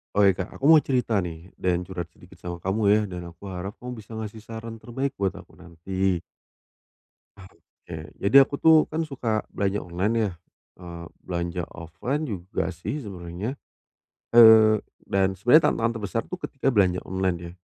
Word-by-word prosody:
Oh, 100 0 +5
iya, 95 - +6
Kak, 90 - -8
aku 135 - -4
mau 155 - +7
cerita 125 -4 0
nih 85 +1 -8
dan 90 -1 -1
curhat 85 -2 -6
sedikit 90 0 -18
sama 85 -1 -5
kamu, 95 +5 -2
ya. 105 - +4
Dan 90 -3 -6
aku 85 +4 -14
harap 95 +3 -6
kamu 125 0 -7
bisa 105 - -18
ngasih 110 0 -6
saran 115 0 -8
terbaik 130 +3 -3
buat 95 -1 -1
aku - - -14
nanti. 90 +1 -2 1.2
Oke, 90 -3 -13 0.2
jadi 100 +7 0
aku 140 - -5
tuh 160 0 +7
kan 160 +1 -2
suka 120 -7 -2
belanja 100 0 0
online 90 +5 -1
ya, 100 - -2 0.5
eee, 85 -1 -8 0.2
belanja 85 0 -3
offline 90 - -4
juga 95 - -3
sih 110 - -5
sebenarnya. 95 +1 -5 0.8
Eee, 110 -2 +8 0.3
dan 95 -1 +2
sebenernya 125 - +5
tantangan 115 +1 0
terbesar 105 +3 -2
tuh 180 - -4
ketika 135 -5 -2
belanja 95 -5 +3
online, 95 -1 0
ya. 85 -1 -8
95 Hz, 165 wpm, -25 LUFS, 90-115 Hz, 1.2 s, Eee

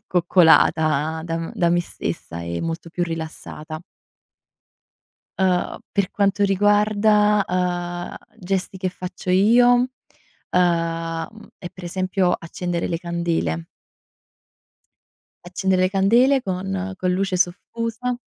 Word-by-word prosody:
coccolata 160 -3 +3
da 165 -1 -3
m 165 0 -5
da 170 - +2
me 175 0 +3
stessa 85 - -6
e 85 0 -4
molto 165 0 -4
più 175 - -2
rilassata. 160 -1 -7 1.6
Uhm, 185 -2 +1
per 200 -2 0
quanto 200 0 +1
riguarda, 210 +1 +3
uhm, 175 -1 -2 0.2
gesti 190 0 -2
che 185 - -1
faccio 180 0 -8
io, 215 +7 +5 0.8
uhm, 165 +3 -1
è 175 - -7
per 185 - -12
esempio 185 0 0
accendere 175 +1 -3
le 165 - -1
candele. 170 - -2 1.8
Accendere 185 +1 0
le 185 - +2
candele 235 +8 +4
con 190 0 -3
con 185 - 0
luce 190 0 0
soffusa 230 +7 -2
180 Hz, 110 wpm, -22 LUFS, 170-195 Hz, 1.8 s, io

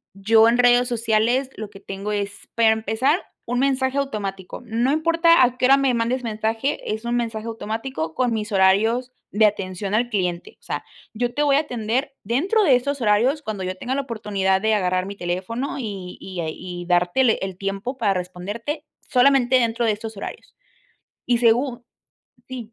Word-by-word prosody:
yo 220 +3 +5
en 235 +1 +3
redes 245 0 +5
sociales 235 +2 +1
lo 215 -2 -6
que 195 - -13
tengo 195 +1 -5
es, 205 -1 -4
para 230 -1 +5
empezar, 220 - +1 0.3
un 245 +1 -1
mensaje 265 0 +1
automático, 200 -10 -4
no 235 +4 +1
importa 335 -1 +4
a 250 0 +1
qué 255 - +1
hora 270 +2 +7
me 275 -2 +2
mandes 240 +2 0
mensaje, 225 +3 -2
es 220 +1 -5
un 240 0 -1
mensaje 225 -2 -3
automático 225 -6 -4
con 250 -2 +1
mis 215 -1 -3
horarios 220 +6 +3 0.2
de 215 +2 +4
atención 195 -1 -3
al 240 +2 +1
cliente, 180 -5 -2
o - - -31
sea, - - -4 0.3
yo 240 +2 -2
te 290 - -1
voy 285 -2 +4
a - - +5
atender 250 0 -2
dentro 345 - +1
de 285 -9 +5
estos 280 +2 -2
horarios 235 +7 +2
cuando 215 -8 -5
yo 185 0 -3
tenga 250 +7 -3
la 280 - 0
oportunidad 200 -6 -1
de 220 +1 +2
agarrar 185 -2 0
mi 200 - -6
teléfono 195 +11 -3
y 195 -6 -6
y 185 -2 -7
a 160 - -3
y 175 +2 -7
darte 175 +7 +2
le 230 - +5
el 190 -2 -4
tiempo 195 +7 -4
para 205 -6 +2
responderte 205 - -5 0.2
solamente 260 -1 +4
dentro 235 0 0
de 225 - +3
estos 220 +1 -6
horarios. 205 - -8 0.7
Y 240 -1 +2
segu 240 +1 +2 0.7
sí, 240 -3 -8
225 Hz, 185 wpm, -22 LUFS, 200-255 Hz, 0.7 s, hora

